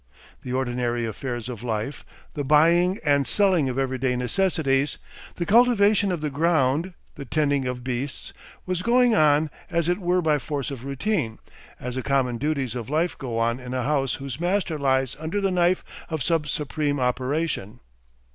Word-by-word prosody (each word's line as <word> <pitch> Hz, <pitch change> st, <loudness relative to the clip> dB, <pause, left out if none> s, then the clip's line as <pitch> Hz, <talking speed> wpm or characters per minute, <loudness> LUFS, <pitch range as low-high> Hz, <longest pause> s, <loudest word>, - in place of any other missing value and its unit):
The 125 Hz, -, -6 dB
ordinary 120 Hz, -2 st, -1 dB
affairs 120 Hz, +1 st, -4 dB
of 120 Hz, -4 st, -6 dB
life, 115 Hz, +3 st, -3 dB, 0.3 s
the 145 Hz, -, -3 dB
buying 170 Hz, +6 st, +4 dB
and 140 Hz, -2 st, +3 dB
selling 185 Hz, -9 st, +3 dB
of 125 Hz, -, -4 dB
everyday 130 Hz, -1 st, 0 dB
necessities, 140 Hz, 0 st, +1 dB, 0.4 s
the 170 Hz, -, -2 dB
cultivation 210 Hz, -2 st, +4 dB
of 175 Hz, -4 st, -2 dB
the 150 Hz, -1 st, -2 dB
ground, 160 Hz, +2 st, +1 dB, 0.2 s
the -, -, -8 dB
tending 140 Hz, -1 st, +1 dB
of 125 Hz, -1 st, -4 dB
beasts, 130 Hz, +2 st, -4 dB, 0.3 s
was 185 Hz, -1 st, -1 dB
going 245 Hz, +3 st, +4 dB
on 155 Hz, -4 st, +4 dB, 0.2 s
as 170 Hz, -1 st, 0 dB
it 180 Hz, +3 st, +1 dB
were 180 Hz, -1 st, +1 dB
by 150 Hz, -2 st, +2 dB
force 140 Hz, 0 st, -4 dB
of 130 Hz, -2 st, -7 dB
routine, 140 Hz, -, -1 dB, 0.4 s
as 125 Hz, 0 st, -5 dB
the 130 Hz, -, -2 dB
common 130 Hz, -3 st, 0 dB
duties 140 Hz, -4 st, -1 dB
of 120 Hz, -1 st, -5 dB
life 160 Hz, +4 st, 0 dB
go 125 Hz, -5 st, -4 dB
on 115 Hz, +2 st, +1 dB
in 125 Hz, 0 st, -6 dB
a 130 Hz, -, -1 dB
house 135 Hz, -1 st, 0 dB
whose 135 Hz, 0 st, -6 dB
master 175 Hz, -3 st, 0 dB
lies 130 Hz, -2 st, +1 dB
under 160 Hz, +6 st, -2 dB
the 195 Hz, -1 st, +1 dB
knife 180 Hz, 0 st, +2 dB, 0.3 s
of 160 Hz, -5 st, -2 dB
some 165 Hz, -1 st, +1 dB
supreme 150 Hz, -1 st, -2 dB
operation. 125 Hz, -2 st, -1 dB
145 Hz, 170 wpm, -24 LUFS, 130-170 Hz, 0.4 s, buying